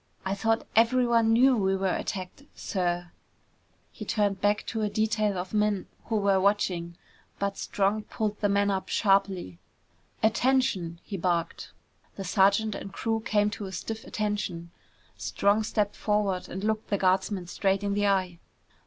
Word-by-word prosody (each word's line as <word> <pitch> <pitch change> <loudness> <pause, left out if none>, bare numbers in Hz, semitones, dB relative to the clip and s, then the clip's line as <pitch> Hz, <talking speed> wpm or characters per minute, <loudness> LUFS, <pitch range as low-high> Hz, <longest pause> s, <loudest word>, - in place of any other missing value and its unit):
"I 190 - 0
thought 225 +3 0
everyone 230 0 +4
knew 255 +3 +5
we 195 -3 +1
were 190 -1 0
attacked, 185 +6 -5
sir!" 175 -2 -2 0.8
He - - -8
turned 205 -3 0
back 205 +1 +1
to 225 - -3
a 210 - 0
detail 215 -1 0
of 180 +2 -5
men 210 -2 +1 0.2
who 225 - -2
were 200 -2 +3
watching. 180 -4 0 0.4
But 200 0 -2
Strong 205 +2 -1
pulled 210 -1 -3
the 205 - +1
man 200 0 +2
up 190 -1 -3
sharply. 195 - +1 0.6
"Attention!" 220 -7 +1
he 200 - -5
barked. 170 -1 -2 0.4
The 195 - -5
sergeant 200 +3 +3
and 195 - -6
the - - -19
crew 225 -1 -1
came 210 -2 +1
to 205 -2 -6
stiff 220 +4 -5
attention. 205 -5 -3 0.5
Strong 205 +2 +1
stepped 210 -1 0
forward 205 -3 0
and 190 - -6
looked 220 0 -1
the 200 - +1
guardsman 190 0 +1
straight 195 +2 0
in 200 0 0
the 205 0 +1
eye. 185 -3 0
200 Hz, 155 wpm, -27 LUFS, 190-215 Hz, 0.8 s, knew